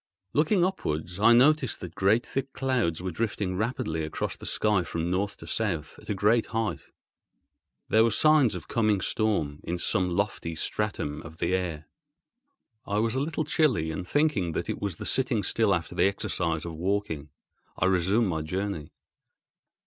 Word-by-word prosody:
Looking 170 +5 +3
upwards 90 - -3
I 110 +3 +6
noticed 130 0 +4
that 90 -3 -7
great 105 +7 +2
thick 135 0 -4
clouds 120 - 0
were 95 - -2
drifting 100 -1 -2
rapidly 90 -7 -2
across 80 - -3
the - - -8
sky 105 -3 +2
from 85 0 -3
North 100 +2 -1
to - - -11
South 85 -9 -2
at - - -15
a 105 - 0
great 105 +4 +3
height. 115 -1 -2 1.1
There 110 +1 +5
were 115 - +4
signs 150 +2 +4
of - - -7
coming 110 -4 +2
storm 85 -12 0
in 85 - -2
some 90 +1 +1
lofty 85 -3 -2
stratum 80 -4 -2
of 80 -1 -11
the 85 +2 0
air. 85 -5 -2 1.0
I 100 - -2
was 115 +1 +1
a 130 - 0
little 155 +2 -1
chilly, 130 - +2
and, 90 +3 -5
thinking 130 - +1
that - - -3
it - - -6
was 100 -4 -2
the - - -7
sitting 125 -5 +1
still 110 -3 +2
after 85 -4 -1
the - - +3
exercise 85 -4 -2
of 85 - -5
walking, 85 -3 -2 0.5
I - - +1
resumed 95 +5 +2
my 80 -4 -1
journey. 90 -1 -4
100 Hz, 170 wpm, -27 LUFS, 85-115 Hz, 1.1 s, I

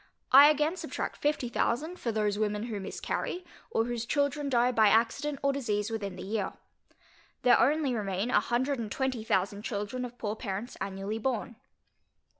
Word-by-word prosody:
I 280 +3 +10
again 305 +4 +1
subtract - - -4
fifty 295 -4 0
thousand, 305 +9 -1
for 235 - -1
those 210 -1 0
women 210 0 0
who 225 -3 -4
miscarry, 355 - -4 0.2
or 225 - +1
whose 240 -1 -3
children 285 +1 0
die 245 -1 +3
by 220 -3 +5
accident 235 +7 +2
or 275 0 +3
disease 215 -5 -1
within 200 -4 -3
the - - -7
year. 205 0 -2 0.9
There 250 - +6
only 290 -2 +3
remain 205 +1 -1
a - - +5
hundred 260 +3 0
and 215 -3 -4
twenty 265 -4 -1
thousand 200 -1 0
children 210 +3 -3
of 245 0 -7
poor 210 -2 -3
parents 215 +1 -5
annually 195 +3 -3
born. 235 -1 -2
235 Hz, 170 wpm, -29 LUFS, 210-270 Hz, 0.9 s, I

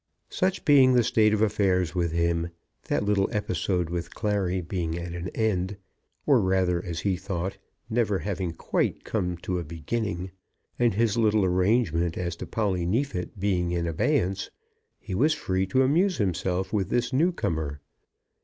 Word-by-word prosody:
Such 185 0 0
being 135 -3 +6
the 120 -1 +5
state 110 -2 +3
of 110 0 +2
affairs 95 -5 +1
with 85 -3 0
him, 85 0 0 0.4
that - - 0
little 100 -1 +2
episode 90 -3 -1
with 85 -1 -4
Clary 100 -4 0
being 85 -2 -3
at 85 0 -5
an 85 +1 -4
end, 100 -3 0 0.5
or - - +5
rather, 95 -2 +1
as 85 -2 -4
he 100 -2 +1
thought, 95 0 -4 0.3
never 110 -4 +1
having 95 -3 -3
quite 80 - -1
come 90 -1 -2
to 90 -1 -1
a - - -3
beginning, 90 +4 -3 0.5
and 120 -5 +3
his 115 0 +2
little 110 -3 +3
arrangement 90 -3 +1
as 85 -2 -2
to - - -6
Polly 100 -5 0
Neefit 95 -1 -2
being 90 -3 +1
in 85 -1 0
abeyance, 90 +4 0 0.5
he 100 - -7
was 150 +11 +3
free 95 -10 -1
to 130 +8 +3
amuse 170 +6 +2
himself 95 -1 -1
with 100 -4 0
this 120 +1 0
newcomer. 80 - 0
95 Hz, 160 wpm, -26 LUFS, 85-110 Hz, 0.5 s, being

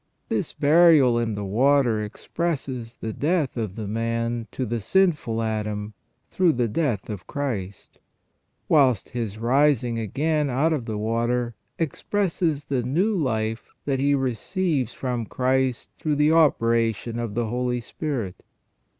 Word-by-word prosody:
This - - -1
burial 145 -5 +5
in 115 -2 -1
the 100 0 -4
water 120 +1 +3
expresses 130 -1 -4
the 110 - -5
death 155 - 0
of 110 -6 -3
the 110 -3 -5
man 115 +1 -2
to 130 - -3
the 120 +1 -2
sinful 145 - +1
Adam 105 -1 -3 0.4
through 180 -4 +3
the 120 -1 +1
death 120 - -1
of 105 -5 -7
Christ; 110 -10 -5 0.7
whilst 130 -9 +3
his 115 -4 -4
rising 125 0 +2
again 150 +7 0
out 145 +6 +2
of 135 -7 -2
the 110 -2 -3
water 120 +2 0 0.2
expresses 165 -1 -1
the 135 -3 -1
new 170 - +1
life 115 - -1 0.2
that 135 -2 0
he 140 +1 +3
receives 135 - -1
from 125 -4 -3
Christ 130 -1 0
through 150 -2 -1
the 150 +2 +3
operation 115 -7 +2
of 115 -3 -4
the 120 0 0
Holy 125 +2 -1
Spirit. 120 - -4
125 Hz, 140 wpm, -24 LUFS, 115-145 Hz, 0.7 s, burial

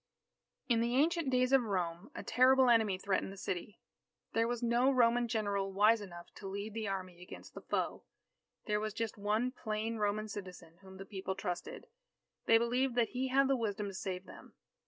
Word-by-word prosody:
_ - - -56 0.6
In 235 -3 +3
the 235 +1 0
ancient 320 +1 +2
days 255 0 +2
of 270 -1 +6
Rome, 185 -2 -2
a - - -6
terrible 255 +1 +5
enemy 220 -5 +3
threatened 190 0 -1
the 195 - -10
city. 185 +2 -5 0.5
There 225 0 +2
was 240 0 -3
no 240 +3 +3
Roman 240 -2 +3
general 200 -3 -1
wise 210 +3 +4
enough 175 -4 -10
to 195 - -7
lead 200 +2 -5
the 220 -1 -3
army 185 -2 -5
against 180 - -11
the - - -9
foe. - - -2 0.6
There 210 -1 +1
was 215 0 -4
just 225 -2 -2
one 215 +4 0
plain 225 -1 -3
Roman 210 0 0
citizen 180 -5 -9
whom 190 -1 -13
the 195 - -8
people 190 -2 -4
trusted. 190 - -5 0.6
They 225 - +7
believed 245 +2 +1
that 235 -2 +2
he 255 +1 -2
had 270 +1 +3
the 270 - +3
wisdom 210 -4 -2
to - - -8
save 185 0 -4
them. - - -14
215 Hz, 195 wpm, -34 LUFS, 195-245 Hz, 0.6 s, They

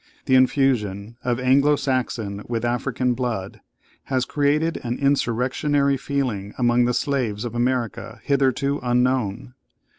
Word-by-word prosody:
The 130 - +1
infusion 120 -6 +2
of 125 -1 0
Anglo 140 +3 +4
Saxon 120 -7 -2
with 115 -1 -2
African 125 +1 0
blood 120 -6 -4 0.4
has 130 -2 0
created 150 +3 +1
an 120 0 -2
insurrectionary 140 +1 +1
feeling 125 -8 -3
among 120 -1 +3
the 125 - +1
slaves 120 -7 -1
of 120 - -5
America 120 -2 -2
hitherto 140 0 +1
unknown. 125 -2 0
125 Hz, 120 wpm, -23 LUFS, 120-140 Hz, 0.4 s, Anglo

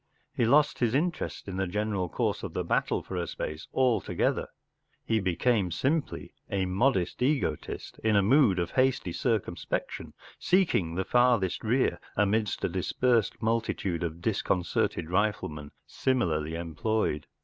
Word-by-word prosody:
He 120 - +1
lost 145 +4 +4
his 120 0 +1
interest 170 -4 -2
in 95 -1 -5
the 95 0 0
general 100 -1 -1
course - - -1
of - - -7
the - - 0
battle - - 0
for 95 - -7
a 85 - -2
space 75 +1 -5
altogether; 130 -3 +1 0.6
he 110 -1 +1
became 95 +2 +1
simply 140 - -2 0.2
a 95 -1 0
modest 95 +1 +1
egotist, 130 - -1
in 110 -1 +3
a 100 - +4
mood 115 -3 +4
of 85 -1 -1
hasty 130 -8 +1
circumspection, 115 -2 -2 0.2
seeking 160 - +2
the 95 +1 -1
farthest 120 -7 +2
rear, 115 -6 +1 0.2
amidst 105 +1 +1
a - - +2
dispersed 120 -3 0
multitude 110 -6 -1
of 85 -1 -4
dis¬ 110 +3 -1
concerted 85 -2 0
riflemen 90 -7 -1 0.2
similarly 80 - 0
employed. 85 0 -1
105 Hz, 140 wpm, -28 LUFS, 90-125 Hz, 0.6 s, lost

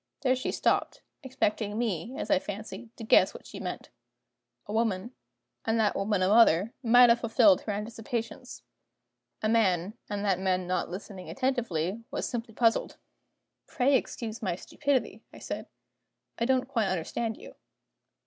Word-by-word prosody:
There 255 -1 +3
she 255 - -2
stopped: - - 0 0.2
expecting 215 -5 -1
me, 230 +1 -2
as - - -3
I 290 - +5
fancied, 220 +1 -7
to 230 - -8
guess 220 - +4
what - - -11
she - - -9
meant. - - -6 0.7
A 205 - -6
woman, 220 0 0 0.5
and 225 0 +1
that 215 -2 +2
woman 195 -1 0
a - - +3
mother, 210 -1 +5
might 245 0 +7
have 235 0 +5
fulfilled 240 +5 +4
her 215 - -4
anticipations. 225 +2 -5 0.8
A - - +2
man, 200 -4 +2 0.2
and 205 0 -3
that 190 -3 +2
man 185 -1 0
not 180 +1 -1
listening 185 0 -8
attentively, 230 - -1
was - - -3
simply 230 -2 -5
puzzled. 230 -2 +1 0.7
"Pray 270 +2 +2
excuse 230 -2 -3
my 185 -5 -1
stupidity," 250 0 -2
I - - -13
said; - - -6 0.7
"I 235 - +1
don't 260 0 +2
quite 230 -6 0
understand 195 +5 -2
you." - - -12
225 Hz, 155 wpm, -29 LUFS, 195-240 Hz, 0.8 s, might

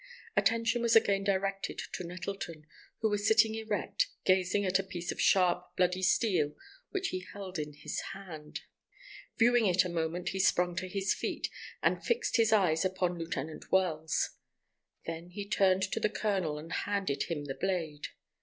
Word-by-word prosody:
Attention 230 +1 +2
was 235 -1 +3
again 200 -3 +4
directed 195 0 -1
to - - -3
Nettleton, 175 -3 -6 0.4
who 220 - +3
was 205 0 0
sitting 220 0 +5
erect, 220 - -1 0.2
gazing 190 +2 +3
at 185 0 +3
a - - 0
piece 175 -2 -4
of - - -4
sharp, 180 -1 +3
bloody 180 0 +2
steel 180 -6 +2 0.3
which 390 -1 -1
he 185 - -2
held 190 -4 -6
in 150 0 -4
his 145 - -4
hand. 160 -6 -8 0.8
Viewing 240 -1 +5
it 185 0 +4
a - - -2
moment, 170 +1 -2
he 190 - -3
sprung 180 -1 +3
to 185 +2 -2
his 195 +1 0
feet, - - -3 0.3
and - - +2
fixed 470 - +1
his 225 -1 +4
eyes 185 -7 +4
upon 185 -2 0
Lieutenant 160 -2 -5
Wells. 160 -5 +1 0.7
Then 165 +1 -5
he 200 +3 -6
turned 190 -2 +3
to 190 - -1
the 215 - +2
colonel 190 -9 -1
and 160 +2 -7
handed 200 -8 -1
him 150 -4 -3
the 135 - -3
blade. 165 -4 -2
185 Hz, 165 wpm, -31 LUFS, 170-205 Hz, 0.8 s, sitting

